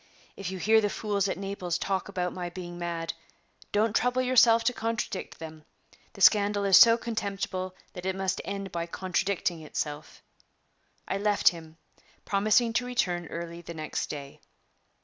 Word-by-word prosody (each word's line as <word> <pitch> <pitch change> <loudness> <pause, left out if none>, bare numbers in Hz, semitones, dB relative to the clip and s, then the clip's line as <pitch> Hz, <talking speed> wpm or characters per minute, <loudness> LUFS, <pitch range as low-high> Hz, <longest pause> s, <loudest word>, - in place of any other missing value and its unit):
If 195 -2 -5
you 190 - -5
hear 220 +4 +4
the 205 - +1
fools 200 -2 -1
at - - -2
Naples 190 -3 -3
talk 190 +1 -2
about 180 -2 -2
my 180 -1 -4
being 175 -1 -8
mad, 170 -1 -3 0.6
don't 215 +1 +1
trouble 250 +1 +2
yourself 235 -2 +5
to 245 +2 +2
contradict 225 -4 -3
them; 160 -1 -9 0.5
the - - -11
scandal 205 -1 +5
is 195 -1 +6
so 230 +2 +9
contemptible 195 -5 -3 0.2
that 180 0 -6
it 190 - -1
must 190 0 -1
end 195 -1 -5
by 170 0 -3
contradicting 185 -1 -1
itself." 150 0 -5 0.8
I 195 - -1
left 205 0 +4
him, 160 -2 -11 0.5
promising 215 +3 +2
to 245 +2 +1
return 175 -9 -1
early 170 0 -6
the 170 0 -9
next 155 -1 -3
day. 140 -2 -8
190 Hz, 160 wpm, -28 LUFS, 175-210 Hz, 0.8 s, so